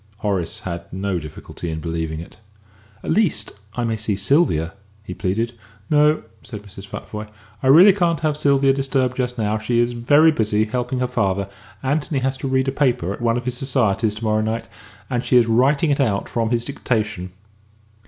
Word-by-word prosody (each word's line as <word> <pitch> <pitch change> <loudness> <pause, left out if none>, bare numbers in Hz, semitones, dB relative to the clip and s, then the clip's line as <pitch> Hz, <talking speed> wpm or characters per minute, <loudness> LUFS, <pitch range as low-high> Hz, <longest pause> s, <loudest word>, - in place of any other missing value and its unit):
Horace 100 -6 -2
had 85 -2 -6
no 95 -1 -2
difficulty 75 +2 -8
in 80 0 -3
believing 80 -1 -3
it. 85 - -11 0.6
"At - - -2
least, 160 - +1 0.2
I 120 - -1
may 115 -1 -1
see 105 -1 -1
Sylvia?" 95 - +2 0.3
he 90 - -6
pleaded. 100 +5 -1 0.4
"No," 150 -1 +4 0.2
said 105 -2 -8
Mrs. 100 -1 -11
Futvoye; 105 +2 -7 0.3
"I 130 - 0
really 175 +9 +8
can't 170 -5 +1
have 155 -2 +1
Sylvia 140 -2 +3
disturbed 135 -2 0
just 125 -1 -2
now. 110 -1 0
She 115 +2 0
is 120 0 +2
very 145 +7 +4
busy, 110 -5 +1
helping 125 +2 -2
her 125 - +1
father. 100 -6 0 0.4
Anthony 145 +2 0
has 135 +1 0
to 135 - -4
read 130 0 +1
a - - +2
paper 125 - 0
at - - -9
one 115 0 +2
of 120 - -5
his 125 -1 -2
societies 115 -5 +1
to 110 - -8
morrow 110 0 +2
night, 110 +1 -2 0.4
and 125 -1 -1
she 125 - +4
is 120 - +5
writing 135 +7 +3
it 140 - +1
out 105 -7 0
from 115 -2 -1
his 120 0 0
dictation." 110 -9 -2
120 Hz, 190 wpm, -21 LUFS, 105-135 Hz, 0.6 s, really